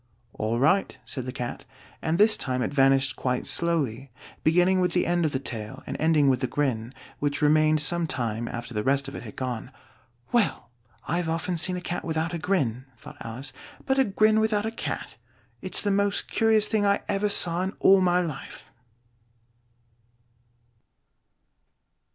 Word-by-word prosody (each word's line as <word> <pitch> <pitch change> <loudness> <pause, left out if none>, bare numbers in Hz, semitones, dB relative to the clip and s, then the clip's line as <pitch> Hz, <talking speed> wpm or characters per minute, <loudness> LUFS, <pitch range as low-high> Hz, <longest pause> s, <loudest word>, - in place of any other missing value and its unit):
"All 110 +2 -2
right," 170 +9 +2
said 130 -2 -6
the - - -3
Cat; 125 -2 -5 0.4
and 160 +1 0
this 215 +2 +6
time 130 -9 -2
it - - -3
vanished 135 -1 +3
quite 125 -1 -2
slowly, 140 -7 -1 0.3
beginning 180 +3 +3
with 180 -1 +1
the 180 - +2
end 175 -1 +1
of 155 - 0
the 130 - -1
tail 110 -5 -5
and - - -5
ending 155 -2 +3
with 130 -2 +3
the 130 - -1
grin, 120 -4 -1 0.3
which 145 +1 -1
remained 155 +1 +4
some 170 +2 +1
time 115 -4 -2
after 120 0 -6
the 105 - -1
rest 140 +2 +1
of 140 - -7
it - - -6
had 110 -4 -10
gone. 125 -3 -4 0.6
"Well! 225 - 0 0.4
I've 170 0 -1
often 165 +2 -1
seen 180 +2 +2
a - - -5
cat 175 0 -4
without 160 +1 -2
a 170 - -3
grin," 135 - -1
thought - - -12
Alice; 125 +4 -7 0.3
"but 265 0 +1
a - - +6
grin 215 0 +3
without 220 -1 +1
a 220 - -2
cat! 230 - -5 0.4
it's - - -2
the 205 - +1
most 200 0 +1
curious 220 -1 +3
thing 215 -2 +1
I 200 0 +2
ever 205 +1 0
saw 175 -3 +2
in 190 +1 -2
all 195 0 +6
my 180 0 +3
life!" 160 -6 -7
160 Hz, 175 wpm, -26 LUFS, 130-185 Hz, 0.6 s, this